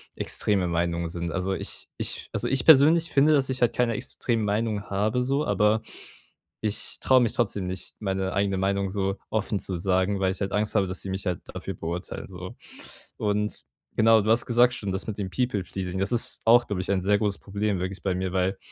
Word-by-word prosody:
extreme 95 -4 +1
Meinungen 85 0 -1
sind. 85 0 -4
Also, 95 +1 -1
ich - - -4
ich - - -3
also - - -1
ich 135 -2 +1
persönlich 160 +3 +6
finde, 145 +3 +5
dass 135 -2 +2
ich 130 -1 -3
halt 120 - +3
keine 120 -1 +2
extremen 115 +1 -2
Meinungen 105 0 -1
habe 105 +5 0
so, 135 +3 0
aber 105 +2 +2 0.8
ich 105 -1 -1
traue 130 -1 +5
mich 115 - +1
trotzdem 105 -5 0
nicht, 95 +1 -6
meine 95 -1 -1
eigene 100 -1 +1
Meinung 100 +1 0
so 95 0 -1
offen 105 -1 -1
zu 95 - -3
sagen, 95 +2 +1
weil 95 -1 +2
ich 95 - -9
halt 95 0 -2
Angst 105 +1 0
habe, 100 -2 +3
dass 95 0 -4
sie - - -6
mich 95 +1 -3
halt 90 -2 -1
dafür - - -5
beurteilen 85 +3 -5
so. 90 0 -9 0.6
Und 105 0 0 0.4
genau, 110 0 +6
du 110 - 0
hast 115 +2 +3
gesagt 120 +1 +4
schon, 100 -5 -4
das 95 +1 -4
mit 110 - -4
dem 95 -2 -3
People 120 -4 -1
Pleasing, 95 0 -5
das 95 +5 -1
ist 120 - -1
auch, 120 +2 +6
glaube 95 -3 -2
ich, 95 - -3
ein 100 -1 +2
sehr 100 +2 +3
großes 105 -2 -1
Problem 100 -1 -2
wirklich 95 0 -4
bei 95 -2 0
mir, 95 0 -2
weil 95 +1 0
100 Hz, 215 wpm, -26 LUFS, 95-115 Hz, 0.8 s, persönlich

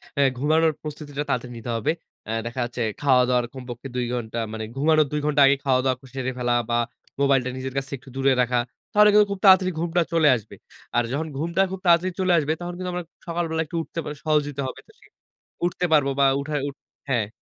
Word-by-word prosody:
অ্যা 140 - +3
ঘুমানোর 155 +4 +3
প্রস্তুতিটা 145 -1 -5
তাড়াতাড়ি 125 0 -2
নিতে 115 +1 -7
হবে। 115 - +1 0.3
অ্যা 110 - -4
দেখা 120 +2 -5
যাচ্ছে 120 0 -5 0.2
খাওয়া-দাওয়ার 125 -3 +3
কমপক্ষে 125 0 -8
২ 125 -1 0
ঘন্টা 115 -1 -3
মানে 110 0 -4
ঘুমানোর 155 +2 +4
২ 150 - 0
ঘন্টা 150 -1 +3
আগে 135 +1 +5
খাওয়া-দাওয়া 130 -1 +2
ক - - -38
সেরে 130 -1 -2
ফেলা 120 -1 0 0.2
বা 120 - +2 0.4
মোবাইলটা 135 -2 +3
নিজের 130 0 -5
কাছ 135 -1 -2
একটু 130 +1 -16
দূরে 135 0 +3
রাখা। 125 0 +1 0.3
তাহলে 210 0 +6
কিন্তু 210 0 +6
খুব 200 - -3
তাড়াতাড়ি 185 -1 +7
ঘুমটা 170 +1 +1
চলে 165 -2 +4
আসবে। 110 -2 -8 0.4
আর 120 - +4
যখন 160 +4 -2
ঘুমটা 170 +5 0
খুব 190 - -5
তাড়াতাড়ি 175 +2 +4
চলে 185 -1 +2
আসবে 155 0 +1
তখন 175 0 -4
কিন্তু 185 0 -4
আমরা 180 0 -3 0.2
সকালবেলা 165 -1 -1
একটু 155 - -8
উঠতে 165 - -7
বা - - -4
সহজই 150 -2 +1
তো 140 - -1
হবে। - - -7
তো - - -18
সে - - -21 0.6
উঠতে 180 +1 -1
পারব 145 -3 +4
বা 140 - +5 0.2
উঠা 150 +2 -4
উঠ 140 - -11 0.3
হ্যাঁ। 115 -6 +1
140 Hz, 210 wpm, -24 LUFS, 125-165 Hz, 0.6 s, তাড়াতাড়ি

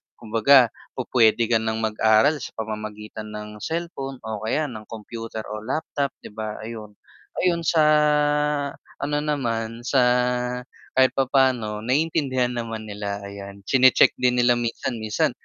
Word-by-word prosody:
kumbaga, 115 +2 +4 0.2
pupuwede 120 -3 +3
ka 115 - +4
ng 110 0 -2
mag-aral 110 +7 +3
sa - - -8
pamamagitan 110 0 -6
ng 105 0 -7
cellphone, 160 - -4
o 110 -1 -4
kaya 155 +7 +1
ng 110 -2 -9
computer 115 0 -7
o 105 0 -4
laptop 140 +4 -2
'di - - -9
ba 110 0 -5
ayun. 110 -2 -8 0.5
Ayun 175 -2 +2
sa 160 -2 +4 1.2
ano 145 +1 0
naman 115 -6 -2
sa 135 +2 +2 1.0
kahit 130 0 +5
papaano 130 -5 +1
naiintindihan 130 -2 0
naman 115 -2 -5
nila 100 -1 -4
ayan, 100 0 -9
chine-check 130 -1 +5
din 125 -1 +2
nila 120 0 +4
minsan, 120 +1 -2
minsan 110 -1 0
115 Hz, 130 wpm, -23 LUFS, 110-130 Hz, 1.2 s, kahit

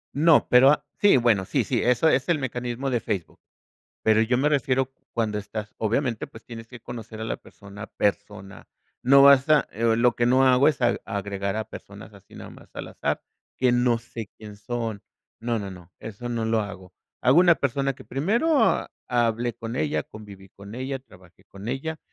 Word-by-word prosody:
No, 155 +1 +4
pero, 125 +2 +6
ah, 150 0 +2
sí, 205 -9 +5
bueno, 115 -5 +2
sí 130 +6 0
sí, 120 +2 -1
eso 125 +6 +3
es 135 +2 +2
el 170 - +3
mecanismo 125 0 -3
de 120 - +1
Facebook. 100 -8 -4 0.6
Pero, 110 0 +4
yo 120 +2 +1
me 145 +3 +2
refiero 135 -2 0 0.2
cuando 110 -3 -1
estás, 105 +1 -7
obviamente, 115 +1 -1
pues, 110 - -14
tienes 115 -1 -9
que 125 -1 -12
conocer 115 -2 -9
a - - -4
la 110 - -3
persona 100 +1 -12
persona. 100 -1 -3 0.3
No 135 +2 +6
vas 140 +1 +6
a, 150 -4 +4
eh, 115 +1 +1
lo 120 0 +3
que 120 - +1
no 130 +2 +4
hago 130 +3 +5
es 150 - +1
a 120 0 +2
agregar 100 -2 -3
a 110 - -3
personas - - -11
así - - -17
nada - - -10
más - - -16
al - - -6
azar, - - -2 0.4
que 125 -1 +3
no 120 -1 +2
sé 115 -2 -9
quién 105 -2 -11
son. 115 -1 -4 0.4
No, 115 0 -1
no, 100 -1 -6
no, 90 -1 -13
eso 115 +3 -7
no 115 -2 -2
lo 110 0 +1
hago. 95 -3 -9 0.3
Hago 130 +7 +5
una 175 -2 +6
persona 135 0 -1
que - - -14
primero 225 - +1 0.2
hable 120 -1 0
con 115 +1 -6
ella, 150 +3 -1
conviví 100 -3 -13
con 100 +3 -12
ella, 130 +1 -4
trabajé 90 -8 -20
con 100 +3 -11
ella, 155 +5 -4
120 Hz, 195 wpm, -25 LUFS, 105-135 Hz, 0.6 s, pero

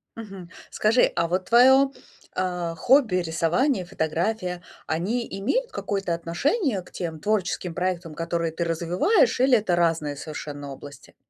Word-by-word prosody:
Мгм. 195 -6 -9 0.2
Скажи, 225 +4 +3
а 170 - +1
вот 185 +2 -1
твоё, 265 +3 +6 0.5
э, 180 -2 -2
хобби, 245 - +4
рисование, 180 - +1
фотография, 180 +2 -2 0.3
они 210 +9 -1
имеют 475 - -1
какое-то 195 -4 -2
отношение 205 - 0
к 180 - -17
тем 165 -3 -5
творческим 185 -2 -1
проектам, 180 -2 -2
которые 165 -1 -2
ты 170 - -2
развиваешь, 175 - +2
или 255 -2 +5
это 195 -4 0
разные 165 -4 0
совершенно 145 -1 -7
области? 145 +1 -12
180 Hz, 135 wpm, -24 LUFS, 165-225 Hz, 0.5 s, твоё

